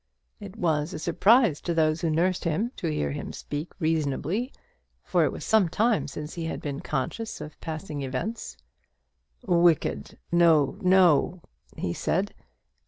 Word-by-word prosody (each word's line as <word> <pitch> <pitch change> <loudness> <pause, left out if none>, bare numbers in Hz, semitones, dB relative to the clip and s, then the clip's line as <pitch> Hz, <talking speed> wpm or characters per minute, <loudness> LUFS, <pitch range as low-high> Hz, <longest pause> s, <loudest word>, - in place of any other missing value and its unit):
It 205 -1 -9
was 160 -2 0
a - - -3
surprise 195 - +3
to 170 - -2
those 155 0 +2
who 165 - 0
nursed 175 +4 +1
him 190 +9 -1
to 170 - -3
hear 75 - -1
him 70 - -5
speak 150 +3 -6
reasonably, 160 - -1 0.5
for - - +2
it - - 0
was - - -7
some 215 -6 +3
time 220 +5 +1
since 150 +2 -7
he 170 -2 -4
had 160 - -3
been 140 -1 -4
conscious 155 - -3
of 150 0 -10
passing 155 -2 -5
events. 135 - -4 0.9
"Wicked! 170 -2 +2
no! 165 -1 +4
no!" 180 -2 +4 0.3
he 85 - -2
said. 195 - -1
165 Hz, 150 wpm, -26 LUFS, 150-185 Hz, 0.9 s, no